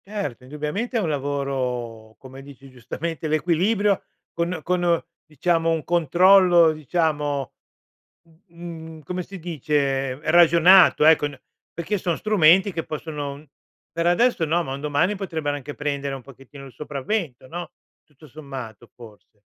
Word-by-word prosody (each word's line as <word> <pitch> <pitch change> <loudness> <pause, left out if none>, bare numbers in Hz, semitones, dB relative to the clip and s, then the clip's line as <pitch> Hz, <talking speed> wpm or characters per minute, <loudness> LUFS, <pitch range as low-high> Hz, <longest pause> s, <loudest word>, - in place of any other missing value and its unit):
Certo, 200 - -5
indubbiamente 150 - -3
è - - +2
un 180 -7 -1
lavoro 130 -6 -3
come 130 0 -12
dici 135 -1 -14
giustamente 155 +7 -5
l'equilibrio, 185 +6 +1 0.3
con 170 0 -2
con 180 0 0
uhm, 170 -1 +1 0.2
diciamo, 165 +2 0
un 165 -2 0
controllo, 175 +1 +5
diciamo, 150 -3 -2 0.7
mhmm, 165 0 -27
mhmm, 160 -2 -9
come 180 +5 -4
si 195 +2 -10
dice? 140 -5 -1
Ragionato 170 -1 +6
ecco, 155 -1 +5
n 145 -1 -11 0.4
perché 170 +5 -2
so 175 -3 -1
strumenti 190 -1 +4
che 165 -2 -4
possono 150 -2 -6 0.5
per 170 0 -2
adesso 175 0 +2
no, 170 +3 +1
ma 135 - -5
un 135 - -6
domani 150 +7 0
potrebbero 160 -7 -3
anche 145 +1 -8
prendere 140 -1 -3
un 135 - -9
pochettino 135 +1 -14
il - - -14
sopravvento, 140 - -4
no, 175 +5 -7 0.3
tutto 150 +1 -20
sommato 130 -6 -9
forse, 110 -2 -16
155 Hz, 140 wpm, -23 LUFS, 140-175 Hz, 0.7 s, Ragionato